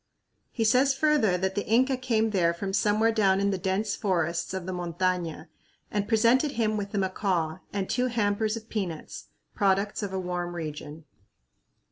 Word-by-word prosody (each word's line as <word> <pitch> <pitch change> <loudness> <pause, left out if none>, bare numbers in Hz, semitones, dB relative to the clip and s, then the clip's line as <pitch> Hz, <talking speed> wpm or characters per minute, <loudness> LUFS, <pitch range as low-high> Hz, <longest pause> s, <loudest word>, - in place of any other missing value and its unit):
He 230 - -2
says 255 +5 +4
further 270 -10 +3
that 190 +1 -1
the 205 - -1
Inca 255 +4 +3
came 230 -4 0
there 170 -4 +2
from 195 +2 -4
somewhere 210 +3 +3
down 195 -4 +3
in 200 0 +1
the 195 - -1
dense 195 +3 -1
forests 170 -4 -1
of 190 -2 -4
the 185 - -4
montaña 175 -1 -2 0.5
and 205 -1 -1
presented 235 +6 +3
him 220 -2 0
with 200 -1 -3
a - - +1
macaw 185 -4 -1
and 195 -2 -2
two 250 +1 0
hampers 215 -1 0
of 220 0 -10
peanuts 185 -9 -5 0.3
products 200 +1 +1
of 200 -2 -3
a 190 - -2
warm 175 -1 -3
region. 155 -1 -7
200 Hz, 170 wpm, -27 LUFS, 180-220 Hz, 0.5 s, says